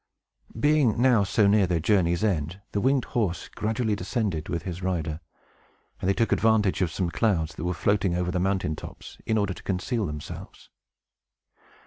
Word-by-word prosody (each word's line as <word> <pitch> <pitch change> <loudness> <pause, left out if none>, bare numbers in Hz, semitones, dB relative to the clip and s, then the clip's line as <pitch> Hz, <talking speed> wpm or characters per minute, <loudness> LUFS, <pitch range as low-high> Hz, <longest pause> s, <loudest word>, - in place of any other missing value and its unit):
Being 145 -5 +3
now 120 -4 +5
so 100 +2 +2
near 100 -1 +4
their 85 -1 +1
journey's 85 +1 +2
end, 90 -3 -1
the 100 - -1
winged 130 +1 +2
horse 95 -9 -1
gradually 110 0 -1
descended 100 -5 -2
with 85 -2 -2
his 90 -1 -5
rider; 80 -4 -2 0.8
and 95 - -1
they - - +4
took 115 -3 +1
advantage 110 -4 +3
of 90 - +2
some 90 -1 -2
clouds 85 -8 +1
that 80 - -6
were 90 0 -1
floating 95 -2 +1
over 90 0 -1
the 90 - -1
mountain 95 -4 0
tops, - - -10
in 110 - +2
order 100 -2 0
to - - -12
conceal 100 +3 -1
themselves. 75 0 -8
95 Hz, 170 wpm, -26 LUFS, 85-110 Hz, 0.8 s, now